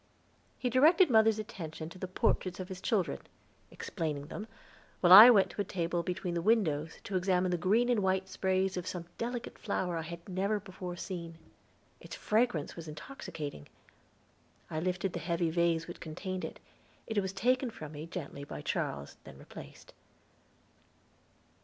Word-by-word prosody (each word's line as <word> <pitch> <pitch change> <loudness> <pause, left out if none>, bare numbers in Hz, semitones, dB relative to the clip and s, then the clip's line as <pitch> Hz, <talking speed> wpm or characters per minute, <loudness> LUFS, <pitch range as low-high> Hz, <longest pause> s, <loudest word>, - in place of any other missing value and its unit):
He 250 - -2
directed 310 - +6
mother's 220 -1 +5
attention 165 -8 -6
to 185 - -12
the 185 - -4
portraits 185 0 0
of 185 - -5
his 185 -1 -7
children, 200 -6 0 0.5
explaining 155 -6 -4
them, 210 +5 -6 0.5
while 180 0 +7
I 215 +5 +13
went 205 -6 +5
to - - -3
a - - +1
table 175 -2 -1
between 180 0 -3
the 170 - -1
windows 165 -7 +1
to 200 - -5
examine 185 0 +2
the 175 - +1
green 215 +8 +3
and 240 -4 +2
white 190 0 +1
sprays 190 0 0
of 180 0 -4
some 175 -2 -4
delicate 240 0 -4
flower 185 -4 -2
I - - -2
had 170 +1 -8
never 200 +3 0
before 185 -2 -7
seen. 170 -2 -6 0.6
Its - - -9
fragrance 215 -9 0
was 165 -1 -8
intoxicating. 150 - -7 1.0
I 155 - -1
lifted 180 +2 -1
the 175 - -3
heavy 170 0 0
vase 170 -1 +1
which 175 - -8
contained 185 +3 -5
it; - - -6 0.5
it 220 -2 0
was 190 -2 -2
taken 250 +6 +1
from 155 -9 -9
me 155 +1 -7
gently 145 -5 -6
by 145 - -7
Charles, 70 0 -3
and - - -12
replaced. - - -12
185 Hz, 165 wpm, -32 LUFS, 170-205 Hz, 1.0 s, I